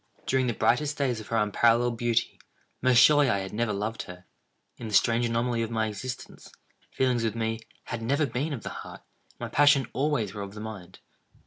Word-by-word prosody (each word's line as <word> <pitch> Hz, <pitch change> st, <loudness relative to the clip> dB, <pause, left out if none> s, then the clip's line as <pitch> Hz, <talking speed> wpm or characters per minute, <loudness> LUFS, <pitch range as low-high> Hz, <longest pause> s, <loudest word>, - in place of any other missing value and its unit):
During 130 Hz, -1 st, +1 dB
the 120 Hz, -, -1 dB
brightest 145 Hz, +4 st, +1 dB
days 130 Hz, -5 st, 0 dB
of 110 Hz, -, -10 dB
her 115 Hz, -, -1 dB
unparalleled 115 Hz, +3 st, +3 dB
beauty, 115 Hz, 0 st, 0 dB, 0.4 s
most 130 Hz, -1 st, +4 dB
surely 145 Hz, +2 st, +6 dB
I 100 Hz, -, +2 dB
had 95 Hz, -1 st, -5 dB
never 115 Hz, 0 st, 0 dB
loved 105 Hz, +3 st, -3 dB
her. 90 Hz, 0 st, -11 dB, 0.5 s
In 115 Hz, -, -7 dB
the 105 Hz, -, -1 dB
strange 120 Hz, +1 st, +3 dB
anomaly 115 Hz, 0 st, 0 dB
of 115 Hz, -, -2 dB
my 110 Hz, -1 st, 0 dB
existence, 115 Hz, +4 st, -7 dB, 0.4 s
feelings 125 Hz, -3 st, 0 dB
with 110 Hz, -1 st, -1 dB
me, 115 Hz, 0 st, -2 dB, 0.2 s
had 120 Hz, -, -5 dB
never 140 Hz, +6 st, +1 dB
been 135 Hz, +5 st, -2 dB
of 130 Hz, -7 st, -5 dB
the -, -, -4 dB
heart, -, -, -10 dB, 0.3 s
and -, -, -42 dB
my -, -, -5 dB
passions 140 Hz, -2 st, +5 dB
always 135 Hz, -8 st, 0 dB
were 105 Hz, -, -6 dB
of 100 Hz, +1 st, -7 dB
the -, -, -7 dB
mind. 105 Hz, -5 st, -9 dB
115 Hz, 205 wpm, -27 LUFS, 110-130 Hz, 0.5 s, surely